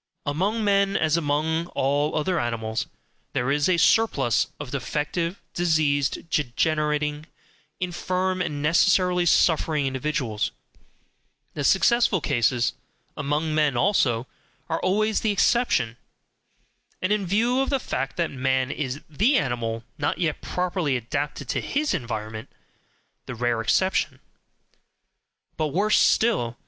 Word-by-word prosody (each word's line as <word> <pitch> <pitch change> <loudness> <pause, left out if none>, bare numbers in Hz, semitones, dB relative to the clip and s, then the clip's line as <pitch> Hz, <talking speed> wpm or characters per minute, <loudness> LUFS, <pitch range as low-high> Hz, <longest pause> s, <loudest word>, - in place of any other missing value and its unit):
Among 195 +10 0
men, 200 -1 +2
as 155 0 +2
among 160 +1 0
all 145 +3 +1
other 165 +3 0
animals, 110 -2 -2 0.5
there 125 +3 0
is 145 +3 +2
a 180 - +3
surplus 145 - +3
of 145 -4 -7
defective, 150 +6 -2
diseased, 155 -4 +1
degenerating, 150 +2 0 0.5
infirm, 185 +1 -1
and 145 -4 -3
necessarily 180 +3 +3
suffering 155 -3 +3
individuals; 130 -4 -1 1.0
the 145 - -4
successful 225 - +3
cases, 120 -4 +1 0.4
among 150 +2 -1
men 150 -4 +2
also, 125 - +2 0.5
are 165 - 0
always 215 +3 +1
the 220 - +1
exception; 200 - +2 1.0
and 185 - -1
in 205 -3 -1
view 235 +7 +2
of 270 - -1
the 275 - +1
fact 135 - -4
that 170 -1 0
man 130 0 0
is 140 0 -4
THE 210 - +2
ANIMAL 115 -5 -2 0.2
NOT 145 +1 0
YET 165 -4 -1
PROPERLY 180 -6 -1
ADAPTED 140 +4 -4
TO - - -1
HIS 295 +2 -1
ENVIRONMENT, 110 -2 -5 0.8
the 125 - -5
rare 120 -1 0
exception. 150 - +1 1.4
But 155 - 0
worse 195 +9 +2
still. 125 - +2
150 Hz, 120 wpm, -24 LUFS, 130-185 Hz, 1.4 s, a